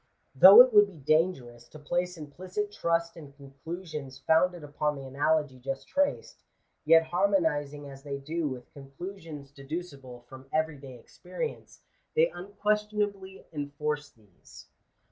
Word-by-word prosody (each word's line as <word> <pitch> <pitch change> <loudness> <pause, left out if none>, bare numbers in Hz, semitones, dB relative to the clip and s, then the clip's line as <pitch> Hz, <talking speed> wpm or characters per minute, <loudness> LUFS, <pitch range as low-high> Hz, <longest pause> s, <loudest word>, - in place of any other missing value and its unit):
Though 190 - +10
it 250 -1 +4
would 205 -1 +7
be 190 -4 -14
dangerous 135 -6 0
to 155 - -13
place 175 +4 -2
implicit 185 +7 -5
trust 170 -3 -1
in 150 -4 -12
conclusions 140 0 -8
founded 160 +4 +2
upon 150 0 -2
the 135 - -8
analogy 140 0 0
just 135 +1 -5
traced, 285 0 -1 0.4
yet 165 +1 +6
harmonizing 160 -6 0
as 135 -1 -11
they 140 -1 -5
do 155 +3 -3
with 130 -3 -8
conclusions 150 +1 -9
deducible 140 -3 -8
from 130 0 -13
every 155 -2 -1
day 135 -3 -11
experience, 475 - -7 0.3
they 480 +1 +4
unquestionably 205 0 -2
enforce 145 0 -3
these. 105 -8 -18
155 Hz, 130 wpm, -28 LUFS, 140-180 Hz, 0.4 s, Though